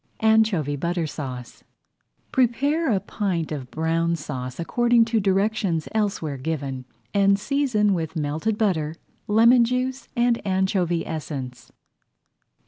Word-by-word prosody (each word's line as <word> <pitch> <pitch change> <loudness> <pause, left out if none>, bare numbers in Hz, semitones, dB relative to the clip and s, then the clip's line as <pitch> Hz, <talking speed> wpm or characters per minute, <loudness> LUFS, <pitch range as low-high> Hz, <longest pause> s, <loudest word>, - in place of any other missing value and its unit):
ANCHOVY 215 -10 +3
BUTTER 170 +3 -1
SAUCE 130 -5 -7 0.7
Prepare 270 +5 +2
a 200 - +2
pint 185 -5 -2
of 135 -4 -5
Brown 165 +1 0
Sauce 130 -4 -6
according 240 +6 +3
to 225 -1 +1
directions 195 -4 0
elsewhere 200 -9 -1
[Page 130 - -12
15] 160 - +1
given 135 -4 -4 0.3
and 200 0 +4
season 220 -4 +1
with 165 -2 -3
melted 160 +8 -1
butter, 160 -8 0 0.3
lemon 235 +3 +6
juice, 255 +2 -2
and 240 -1 +2
anchovy 190 -3 0
essence. 140 -5 -6
190 Hz, 125 wpm, -24 LUFS, 155-220 Hz, 0.7 s, lemon